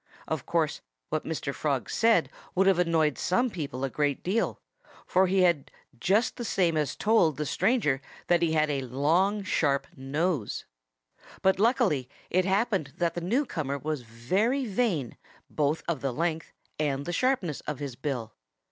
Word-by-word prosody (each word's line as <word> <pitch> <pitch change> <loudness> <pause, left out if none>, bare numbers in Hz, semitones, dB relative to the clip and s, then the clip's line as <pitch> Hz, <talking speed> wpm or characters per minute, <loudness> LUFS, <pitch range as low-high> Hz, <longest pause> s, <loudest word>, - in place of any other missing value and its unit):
Of - - -3
course, - - 0 0.3
what - - -2
Mr. - - -3
Frog - - -1
said - - +3 0.2
would 190 - +4
have 190 -2 +4
annoyed 160 -4 +2
some 245 +6 +1
people 140 -7 -4
a 135 - 0
good 145 -2 0
deal, 205 +6 0 0.5
for 185 +1 +3
he 190 0 +3
had 170 -6 +2 0.3
just 205 - +2
the 240 - -4
same 180 -6 +1
as 150 -2 0
told 210 -9 +3
the 150 - -2
stranger 185 - +1 0.2
that 175 -1 +3
he 165 -2 +2
had 155 -1 +2
a 140 -1 -1
long, 165 - +1
sharp 145 -7 +1
nose. 140 - -2 0.8
But 190 0 +3
luckily 215 - +2 0.2
it 185 +1 +3
happened 195 - +1
that 170 -1 +1
the 175 - -4
newcomer 175 - -1
was 150 0 -3
very 185 - 0
vain 195 - -1 0.3
both 150 +1 0
of 165 -6 -1
the 135 - -1
length 160 +3 -2 0.3
and 140 -2 0
the 175 - -3
sharpness 210 - 0
of 150 -2 -2
his 140 -3 -5
bill. 125 -5 -4
165 Hz, 165 wpm, -28 LUFS, 140-195 Hz, 0.8 s, would